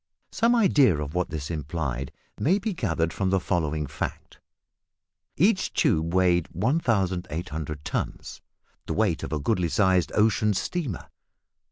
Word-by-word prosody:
Some 235 +2 +3
idea 145 - +4
of 75 0 -4
what 90 0 -1
this 75 -1 -5
implied 70 -4 -3 0.3
may 180 +7 +3
be 210 +1 -2
gathered 85 - -1
from 95 -1 -1
the 95 0 +2
following 80 -3 -1
fact. - - -6 1.0
Each - - +3
tube 80 +2 +1
weighed 90 -2 +3
1800 90 - -1
tons - - -4 0.5
the - - -1
weight 100 -7 +1
of - - -5
a 80 - 0
goodly 90 +2 0
sized 95 -2 +2
ocean 105 -1 +3
steamer! 140 - -3
90 Hz, 135 wpm, -26 LUFS, 80-110 Hz, 1.0 s, idea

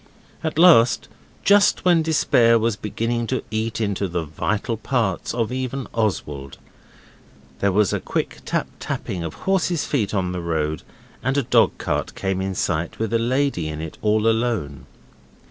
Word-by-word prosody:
At 160 -1 -2
last, 160 -9 +6 0.3
just 200 -1 +4
when 175 -2 +5
despair 125 -7 +4
was 115 -1 0
beginning 115 +3 -2
to 130 - -2
eat 110 +1 -2
into 100 -2 -1
the 85 -1 -2
vital 105 - -2
parts 110 -4 -1
of 115 -1 -1
even 130 0 -3
Oswald, 75 -11 -2 1.0
there 100 - +2
was 105 +1 +2
a - - 0
quick - - -3
tap - - -1
tapping 90 -3 -4
of 80 - -5
horses' 180 -4 +1
feet 110 -7 -1
on 90 -2 0
the 90 -1 -4
road, 80 -2 -1 0.4
and 130 +3 0
a 140 - +2
dogcart - - +1
came 95 -1 -2
in 95 0 -3
sight 85 -1 -1
with 110 0 -2
a 115 - +3
lady 125 - 0
in 75 0 -5
it 80 -1 -7
all 105 0 +2
alone. 115 - 0
110 Hz, 160 wpm, -22 LUFS, 90-125 Hz, 1.0 s, last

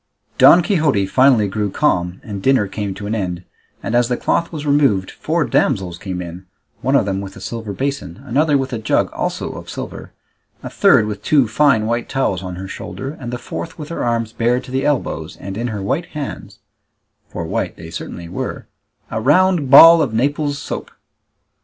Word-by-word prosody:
Don 175 - +8
Quixote 155 - +2
finally 125 0 +4
grew 105 +1 -2
calm, 90 -7 0
and 100 -3 -6
dinner 130 -2 +3
came 100 0 -4
to 100 +2 -7
an 105 - -2
end, 90 -4 -3 0.4
and 115 - -3
as 120 0 +3
the 125 -1 -1
cloth 170 - 0
was 150 -3 -6
removed 140 -10 +2
four - - -1
damsels 90 -3 0
came 90 -2 -5
in, 90 +2 -10 0.3
one 135 +2 +1
of 140 - +3
them 95 -1 -2
with 95 -1 -8
a - - -10
silver 115 -3 -5
basin, 135 -6 -4
another 145 +3 +2
with 135 -1 -3
a 115 - -2
jug 110 - +1
also - - -3
of - - -9
silver, - - -7 0.5
a - - -6
third 110 - +4
with 105 -1 -5
two 140 0 +3
fine 120 -2 +3
white 120 +1 -2
towels 115 -9 0
on 90 -1 -6
her 95 +2 -7
shoulder, 135 +7 -6
and 120 -2 -6
the 125 - -3
fourth 165 - -7
with 150 -2 -8
her 170 - -3
arms 115 -1 -1
bared 120 +2 +1
to 125 - -11
the 130 +1 -1
elbows, 85 - -2
and 95 +1 -7
in 120 +3 -2
her 105 -4 -4
white 155 - -1
hands 105 -8 -6 0.7
(for 85 - -5
white - - -2
they - - -10
certainly 85 - -7
were) - - -5 0.5
a 110 - -2
round 160 +2 +3
ball 165 +4 +10
of 120 -7 -1
Naples 145 +4 0
soap. - - -6
115 Hz, 195 wpm, -19 LUFS, 100-140 Hz, 0.7 s, ball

